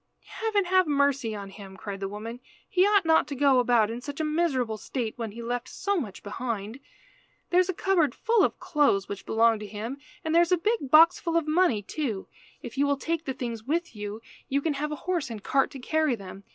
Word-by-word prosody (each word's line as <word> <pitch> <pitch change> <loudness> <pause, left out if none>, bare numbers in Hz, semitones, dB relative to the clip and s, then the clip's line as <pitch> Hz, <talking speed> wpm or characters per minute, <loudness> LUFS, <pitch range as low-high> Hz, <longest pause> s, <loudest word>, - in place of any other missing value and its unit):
"Heaven 430 -3 -1
have 370 -1 +3
mercy 280 -6 +1
on 200 -1 -7
him!" 195 -1 -11
cried 200 0 -6
the 195 - -3
woman. 225 +4 -7 0.3
"He 370 +2 +3
ought 410 -3 +4
not 320 0 +4
to 285 - -5
go 270 -1 +4
about 235 -3 +3
in 235 +2 -5
such 285 +2 -7
a - - 0
miserable 300 -8 0
state 230 0 -4
when 230 -3 -5
he 235 +1 -7
left 245 +1 -3
so 400 +1 -1
much 225 - -4
behind. 220 +1 -4 0.7
There 360 - +5
is 365 0 +2
a - - +1
cupboard 340 -10 +2
full 455 -3 +2
of - - 0
clothes 295 - +2
which 200 -1 -7
belonged 225 0 +3
to 210 - -7
him, 220 +7 -6 0.3
and 320 - 0
there 340 - +6
is 345 - +1
a 360 - +5
big 415 - -1
box 325 +4 +7
full 335 -1 0
of 325 -2 0
money, 305 - +2
too. 225 -4 -3 0.4
If - - -7
you 285 - +3
will 285 0 +1
take 330 +3 -2
the 265 - -2
things 235 -4 -5
with 330 +1 -2
you, 210 +1 -6 0.3
you 275 - +2
can 305 +1 -1
have 300 +2 -3
a - - -2
horse 355 -7 -1
and 215 -3 -7
cart 270 0 +2
to - - -9
carry 310 0 +1
them. 195 -1 -11
275 Hz, 230 wpm, -27 LUFS, 220-330 Hz, 0.7 s, box